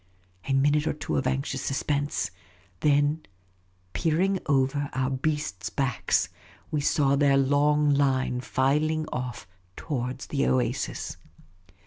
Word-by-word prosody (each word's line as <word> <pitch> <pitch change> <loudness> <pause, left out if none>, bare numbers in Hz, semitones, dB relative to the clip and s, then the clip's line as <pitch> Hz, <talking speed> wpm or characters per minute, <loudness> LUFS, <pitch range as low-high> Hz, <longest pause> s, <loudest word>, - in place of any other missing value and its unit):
A 135 - +1
minute 145 +3 +3
or - - +1
two 150 +1 -4
of 130 - +1
anxious 135 0 -1
suspense; 145 -1 -1 0.5
then, 145 +1 +2 0.7
peer 160 -1 +1
ing 195 +1 +2
over 140 0 +1
our 130 0 0
beasts' 135 -7 -2
backs, 135 -5 0 0.4
we 150 - 0
saw 140 -1 +2
their 140 -1 +4
long 145 +2 +3
line 130 -3 +1
filing 150 +5 +1
off 125 -2 -4 0.3
towards 130 -3 -4
the 140 -1 0
oasis. 130 -1 -1
140 Hz, 120 wpm, -27 LUFS, 130-150 Hz, 0.7 s, their